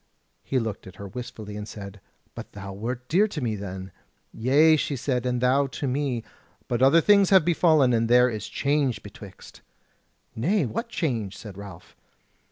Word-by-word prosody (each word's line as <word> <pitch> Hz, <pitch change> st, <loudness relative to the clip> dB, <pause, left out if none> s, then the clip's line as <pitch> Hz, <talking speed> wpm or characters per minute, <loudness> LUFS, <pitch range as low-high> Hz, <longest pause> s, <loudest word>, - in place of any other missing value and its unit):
He 135 Hz, -, -2 dB
looked 110 Hz, -6 st, -3 dB
on 95 Hz, -, -10 dB
her 100 Hz, +1 st, -9 dB
wistfully 110 Hz, -2 st, -8 dB
and 105 Hz, 0 st, -6 dB
said: 100 Hz, -2 st, -9 dB, 0.3 s
"But -, -, -9 dB
thou 100 Hz, -1 st, -8 dB
wert 120 Hz, +5 st, -5 dB
dear 195 Hz, +7 st, +3 dB
to 190 Hz, -7 st, -5 dB
me 115 Hz, -5 st, -1 dB
then." 95 Hz, -1 st, -7 dB, 0.4 s
"Yea," 145 Hz, +7 st, +4 dB
she 145 Hz, -1 st, -1 dB
said, 125 Hz, -1 st, -1 dB
"and 125 Hz, -1 st, -1 dB
thou 135 Hz, +3 st, +3 dB
to 135 Hz, +2 st, -5 dB
me; 130 Hz, -3 st, -1 dB, 0.4 s
but 120 Hz, 0 st, -1 dB
other 140 Hz, +6 st, +6 dB
things 200 Hz, +1 st, +5 dB
have 190 Hz, -5 st, +5 dB
befallen, 155 Hz, -6 st, +4 dB
and 115 Hz, 0 st, +1 dB
there 125 Hz, +1 st, +6 dB
is 110 Hz, -4 st, -4 dB
change 140 Hz, -3 st, 0 dB
betwixt." 100 Hz, -1 st, -13 dB, 0.7 s
"Nay, 170 Hz, -, +1 dB
what 230 Hz, -, -4 dB
change?" 115 Hz, -, -2 dB
said 105 Hz, -3 st, -10 dB
Ralph. 95 Hz, -3 st, -11 dB
125 Hz, 175 wpm, -25 LUFS, 105-145 Hz, 0.7 s, other